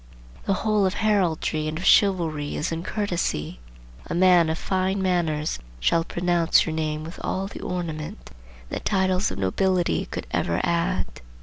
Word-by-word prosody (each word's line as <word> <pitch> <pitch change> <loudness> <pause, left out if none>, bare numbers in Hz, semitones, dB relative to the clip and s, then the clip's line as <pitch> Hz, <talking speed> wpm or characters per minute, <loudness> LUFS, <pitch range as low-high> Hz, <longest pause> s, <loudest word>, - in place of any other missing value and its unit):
The 195 - +2
whole 210 -3 +3
of 185 - -2
heraldry 175 -7 +1
and 155 0 -3
of 180 - -5
chivalry 165 -7 +3
is 150 - -2
in 165 0 -2
courtesy. 175 - -2 0.5
A - - -3
man 175 -2 +5
of 160 - -1
fine 190 +1 0
manners 165 - 0 0.2
shall 165 - +2
pronounce 175 -1 +2
your 160 - -3
name 155 -1 -2
with 165 +2 -9
all 190 +1 -1
the 195 - -8
ornament 170 +1 -5 0.4
that - - -4
titles 190 -1 +1
of - - -6
nobility 175 - +1
could - - -5
ever 85 +1 0
add. 170 +2 +1
175 Hz, 160 wpm, -24 LUFS, 155-190 Hz, 0.5 s, man